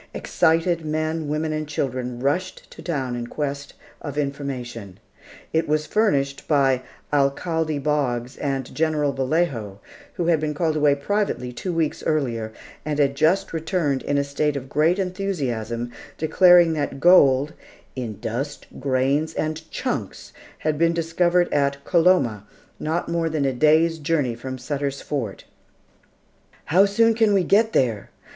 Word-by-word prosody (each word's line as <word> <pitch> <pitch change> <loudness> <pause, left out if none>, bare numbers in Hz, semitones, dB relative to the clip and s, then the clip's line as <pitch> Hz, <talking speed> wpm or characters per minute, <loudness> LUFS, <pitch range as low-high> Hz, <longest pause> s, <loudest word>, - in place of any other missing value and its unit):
Excited 165 0 +1
men, 155 0 -2
women, 155 +1 -1
and 155 0 -3
children 130 -4 -3
rushed 145 +8 -2
to - - -11
town 135 -7 -2
in 120 -1 -4
quest 140 +1 -4 0.3
of 145 -2 -6
information. 130 -8 -4 0.5
It 160 +1 +1
was 150 0 +1
furnished 140 -12 0
by 135 -4 +3 0.3
Alcalde 155 +2 +1
Boggs 135 -4 -1
and 135 -2 -3
General 155 -3 +1
Vallejo, 130 - -1 0.4
who 175 - -1
had 165 -2 +3
been 150 -1 -2
called 160 0 0
away 145 -2 +3
privately 140 -6 -2
two 180 +9 -4
weeks 165 -3 -1
earlier, 120 -8 -1 0.3
and 150 0 -2
had 140 -2 +2
just 160 +8 +1
returned 160 -4 -1
in 145 - -1
a 140 - +2
state 140 +1 -1
of 135 -1 -5
great 160 +6 +2
enthusiasm, 135 - -3 0.3
declaring 175 +1 +5
that 145 -3 -3
gold, 145 -4 +5 0.4
"in 115 -5 -5
dust, 135 +6 -4
grains, 140 +4 0
and 155 +1 -3
chunks - - -4 0.2
had 155 -1 -1
been 170 0 +3
discovered 175 +2 +2
at 140 -1 0
Coloma, 165 - +2 0.3
not 160 +3 -2
more 170 -1 0
than 155 -3 -1
a 135 - +1
day's 160 +4 +3
journey 145 -5 0
from 130 +3 -6
Sutter's 140 +1 -3
Fort." 120 -10 -4 1.2
"How 185 +6 +5
soon 225 +3 +3
can 220 -2 +3
we 190 - +3
get 220 +5 +3
there?" 115 -6 +1
150 Hz, 145 wpm, -23 LUFS, 135-165 Hz, 1.2 s, declaring